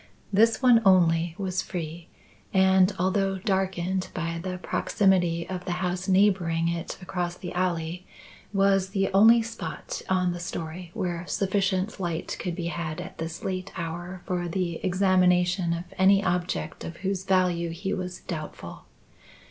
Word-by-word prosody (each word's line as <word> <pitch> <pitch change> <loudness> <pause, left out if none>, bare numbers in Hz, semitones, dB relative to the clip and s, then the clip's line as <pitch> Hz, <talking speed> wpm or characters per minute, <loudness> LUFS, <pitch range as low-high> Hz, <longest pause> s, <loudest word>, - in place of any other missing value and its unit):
This 225 +5 +4
one 240 -3 +6
only 170 -3 +4
was 185 -2 -1
free 170 -1 -6 0.5
and, 190 0 +5
although 195 +1 +1
darkened 190 -1 -1
by 165 0 -2
the 180 0 -4
proximity 180 -3 +1
of 185 -1 -5
the 180 - -1
house 180 0 -2
neighbouring 185 -4 +3
it 170 0 -4
across 175 -1 -3
the 175 - -7
alley, 180 -1 -2 0.4
was 195 -1 +3
the 195 0 0
only 225 +4 +7
spot 230 - -6
on 185 -1 +2
the 175 - -6
storey 170 0 -5
where 175 -1 -3
sufficient 195 0 0
light 170 -3 -3
could 175 -2 -3
be 175 -2 -4
had 160 -1 -4
at 180 0 -8
this 165 +1 -5
late 185 0 -3
hour 175 +2 -5
for 175 -1 -2
the 170 -1 -2
examination 180 -1 +3
of 170 0 -2 0.2
any 195 +1 +5
object 175 -4 -2
of 170 - -7
whose 190 -1 -1
value 180 -3 +2
he 180 +4 -3
was 180 -1 -5
doubtful. 155 -4 -7
180 Hz, 150 wpm, -26 LUFS, 170-190 Hz, 0.5 s, only